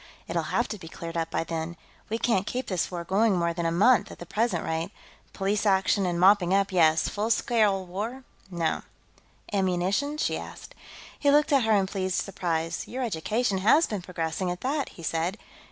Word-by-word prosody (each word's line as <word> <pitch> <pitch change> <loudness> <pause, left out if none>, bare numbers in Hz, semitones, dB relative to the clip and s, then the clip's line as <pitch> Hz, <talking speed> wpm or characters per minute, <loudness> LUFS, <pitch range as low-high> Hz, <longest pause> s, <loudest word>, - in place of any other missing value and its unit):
"It'll - - 0
have - - +1
to 215 - -5
be 165 - -10
cleared 165 +1 -7
up 165 -1 -1
by 165 - -1
then. 165 +1 -4 0.3
We 225 - -1
can't 225 -4 +1
keep 255 +1 -2
this 185 -7 -1
war 175 -2 -5
going 195 +3 +2
more 170 -1 +1
than 170 0 -1
a - - 0
month, 210 +7 +4
at - - -10
the 175 - -9
present 210 -2 0
rate. 160 +2 -2 0.4
Police 200 +1 -1
action, 195 -1 +2
and 175 -1 -1
mopping 190 0 +5
up, 200 0 +1
yes, 160 -3 +4
full 210 +2 -2
scale 215 -4 +2
war, 215 +9 -5 0.3
no." 170 -3 -1 0.7
"Ammunition?" 195 +9 0
she - - 0
asked. - - -10 0.5
He 285 - +3
looked 295 +1 +4
at 270 -5 +4
her 220 - +3
in 200 -2 +3
pleased 190 -1 -1
surprise. 165 -4 -2
"Your 260 +1 -4
education 210 +1 0
has 260 - +5
been 210 -4 -4
progressing, 175 0 -3
at 175 0 -4
that," 280 +2 -1
he 170 - -13
said. 165 +5 -1
190 Hz, 195 wpm, -27 LUFS, 170-220 Hz, 0.7 s, mopping